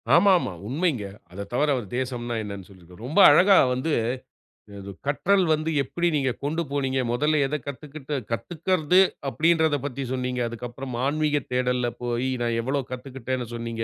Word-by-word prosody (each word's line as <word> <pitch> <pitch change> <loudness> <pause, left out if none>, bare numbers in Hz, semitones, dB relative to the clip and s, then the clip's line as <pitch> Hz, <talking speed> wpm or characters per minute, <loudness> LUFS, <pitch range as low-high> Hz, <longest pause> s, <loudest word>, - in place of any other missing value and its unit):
ஆமாமா, 180 - +4 0.2
உண்மைங்க. 140 - 0 0.3
அதத் 100 +2 -7
தவிர, 145 +5 +2
அவரு 120 -6 -4
தேசம்ன்ன 120 -2 -3
என்ன 100 -2 -7
சொல்லியிருந்தார். 90 +1 -15
ரொம்ப 155 +9 +1
அழகா 190 +6 +6 0.2
வந்து 130 +6 -2 0.9
அது 100 0 -8 0.2
கற்றல் 190 +7 +2
வந்து 155 +1 -1
எப்படி 175 +6 -1
நீங்க 135 -3 +1
கொண்டு 160 +4 -1
போனீங்க. 135 -2 -1
மொதல்ல 150 +5 +1
எதக் 150 -2 -4
கத்துக்குட்டு 145 +1 -6 0.2
கத்துக்கறது 170 +7 +1 0.3
அப்படின்றதப் 160 -2 +2
பத்தி 140 0 -4
சொன்னீங்க. 125 -1 -2
அதுக்கு 120 +1 -6
அப்புறம் 130 0 -7
ஆன்மீக 150 +1 +1
தேடல்ல 125 -1 +1 0.2
போய், 120 +1 -1
நான் 120 -1 0
எவ்வளோ 135 +4 -1
கத்துக்குட்டேன்னு 125 -1 -4
சொன்னீங்க. 115 -1 -4
130 Hz, 150 wpm, -25 LUFS, 120-155 Hz, 0.9 s, அழகா